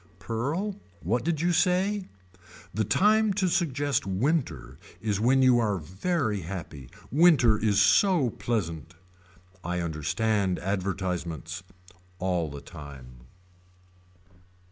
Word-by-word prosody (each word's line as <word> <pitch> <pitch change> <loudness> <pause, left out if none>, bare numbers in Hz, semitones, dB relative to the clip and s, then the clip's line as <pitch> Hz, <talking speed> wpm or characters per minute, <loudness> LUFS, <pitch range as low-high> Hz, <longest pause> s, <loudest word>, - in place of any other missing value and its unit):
Pearl. 145 - -3 0.2
What 110 +9 0
did 160 -2 -1
you 175 +1 +2
say. 185 +3 +1 0.7
The 110 +4 0
time 215 - +3
to 190 -1 +1
suggest 145 - 0
winter 100 - -1 0.2
is 105 -2 -1
when 130 +4 +3
you 125 -2 +5
are 105 -4 +1
very 105 - -2
happy. 80 -7 -7 0.2
Winter 145 -7 +5
is 105 -2 +2
so 165 - +4
pleasant. 85 -10 -3 0.7
I 90 +1 -2
understand 90 +5 0
advertisements. 90 -3 -3 0.6
All 90 -4 -1
the 70 0 -8
time. 65 -6 -12
105 Hz, 105 wpm, -27 LUFS, -, 0.7 s, you